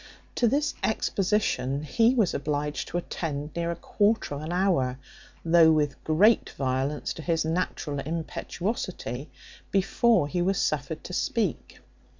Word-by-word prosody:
To 240 - +2
this 290 +5 +1
exposition 190 -10 0
he 230 - +3
was 215 -7 +2
obliged 150 +1 -2
to 175 - -3
attend 150 -4 -4
near 170 0 -1
a 170 - -1
quarter 205 +1 0
of 145 - -5
an 155 +2 -5
hour, 175 -9 +1 0.5
though 165 -1 +6
with 150 -3 0
great 200 +9 +4
violence 135 +2 -1
to - - -8
his 165 +1 0
natural 160 -3 -2
impetuosity, 165 - -4 0.4
before 195 -2 +3
he 175 +4 -1
was 190 +2 +1
suffered 150 +1 -1
to 180 - -8
speak. 200 - -2
165 Hz, 140 wpm, -27 LUFS, 145-195 Hz, 0.5 s, though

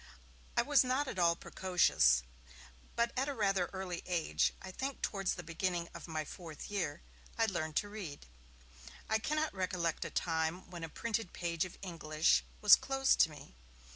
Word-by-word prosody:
I - - +5
was 290 -2 +5
not 260 +3 0
at 200 - -4
all 170 -1 +4
precocious, 170 - +3 0.7
but 235 0 +1
at 265 +3 0
a 280 - -3
rather 195 -5 +1
early 185 -3 -4
age, 175 -3 +1
I 190 - -8
think 270 +7 -4
towards 195 -2 0
the 180 - -7
beginning 170 +1 -2
of - - -8
my 155 -2 -3
fourth 165 +3 -9
year, 170 -7 -2 0.3
I 225 - +4
learned 160 -7 -2
to 205 - +1
read. 200 -9 -7 0.8
I 220 - +2
cannot 305 +6 -1
recollect 180 -3 -1
a - - -4
time 160 +1 -1
when 170 -2 -7
a 165 - -4
printed 225 +2 -3
page 170 -1 -1
of 180 - -10
English 160 -3 +2 0.2
was 210 -1 +10
closed 270 0 +1
to 165 - +6
me. 150 - -12
180 Hz, 170 wpm, -34 LUFS, 165-215 Hz, 0.8 s, was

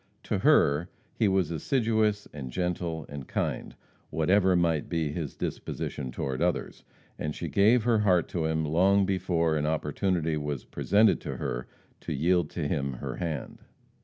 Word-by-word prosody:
To - - -1
her, 75 +5 +4 0.2
he 110 - +2
was 95 -4 +1
assiduous 110 - +1
and 70 -4 -6
gentle 85 0 -2
and 70 -2 -8
kind, - - -3 0.3
whatever 95 +3 +3
might 85 -4 +1
be 80 -3 -1
his 75 -2 -4
disposition 65 -4 -4
toward 65 +2 -3
others, 85 -2 -1 0.4
and 75 0 -3
she - - -4
gave 110 +4 +4
her 115 -2 +3
heart 90 -5 +3
to 85 -3 -1
him 80 0 0
long 95 +6 +3
before 85 -4 +1
an 75 0 0
opportunity 80 +1 0
was 75 -3 -4
presented 105 +2 +3
to - - -5
her - - -3 0.3
to - - -4
yield 85 +2 +2
to 80 -5 -3
him 70 -4 -1
her 60 - -5
hand. 80 -4 -4
85 Hz, 160 wpm, -28 LUFS, 75-95 Hz, 0.4 s, her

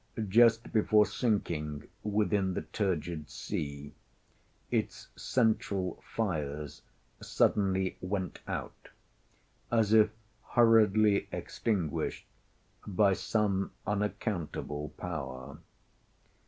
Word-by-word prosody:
Just 115 +3 +4
before 105 -1 +5
sinking 80 - -1
within 105 -3 +1
the - - -2
turgid 85 -3 -2
sea, 70 0 -5 0.8
its - - -2
central 105 -6 0
fires 75 - -2 0.4
suddenly 95 -2 +1
went 95 -1 -3
out, - - -6 0.8
as 110 -2 +3
if 110 -1 +6 0.4
hurriedly 110 -3 +5
extinguished 95 -10 -2 0.6
by 100 0 +3
some 100 -1 0
unaccountable 90 -7 -2
power. 70 -6 -6
95 Hz, 75 wpm, -31 LUFS, 80-110 Hz, 0.8 s, if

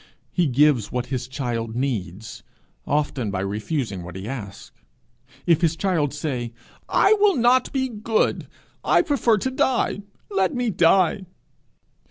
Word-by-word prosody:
He 175 -3 +1
gives 140 -3 +3
what 125 -1 -2
his 125 -1 -2
child 120 -4 -3
needs 110 -6 -4 0.5
often 145 -6 -1
by 95 -1 -2
refusing 105 - -3
what 90 +1 -9
he 95 +2 -6
asks. 110 -6 -7 0.7
If 170 -3 +3
his 165 -2 +2
child 165 -6 0
say, 130 -6 -4 0.4
'I 400 - +5
will 405 -2 +4
not 245 +1 +3
be 265 -1 0
good; 220 -1 -1 0.4
I - - +4
prefer 260 -8 +2
to 260 +6 -2
die; 255 -5 0 0.3
let 195 +1 +1
me 245 -2 0
die!' 185 +2 +3
150 Hz, 140 wpm, -23 LUFS, -, 0.7 s, I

